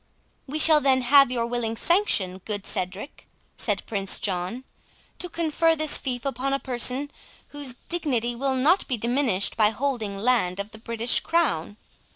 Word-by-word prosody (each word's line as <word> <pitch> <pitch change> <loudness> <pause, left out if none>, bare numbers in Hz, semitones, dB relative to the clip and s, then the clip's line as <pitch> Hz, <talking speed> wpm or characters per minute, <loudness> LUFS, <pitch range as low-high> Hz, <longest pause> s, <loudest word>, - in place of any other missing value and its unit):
"We 290 +3 -4
shall 310 -1 +7
then 265 -2 +2
have 275 +1 +5
your 235 -2 -1
willing 235 -1 -2
sanction, 210 - +1
good 205 -2 -3
Cedric," 190 +8 -5 0.3
said - - -2
Prince 195 -3 -1
John, 190 +6 -2 0.6
"to 360 - -4
confer 330 0 +1
this 310 -1 +3
fief 250 -1 -4
upon 275 0 -2
a 275 - 0
person 260 +3 -1 0.4
whose 285 -4 -4
dignity 250 -9 -1
will 265 +2 -1
not 310 +9 +2
be 250 - -2
diminished 235 -4 0
by 215 -2 +3
holding 225 -5 -3
land 200 -4 0
of 200 +2 -6
the 220 - -12
British 230 +1 +1
crown. 215 - -1
245 Hz, 160 wpm, -24 LUFS, 215-285 Hz, 0.6 s, shall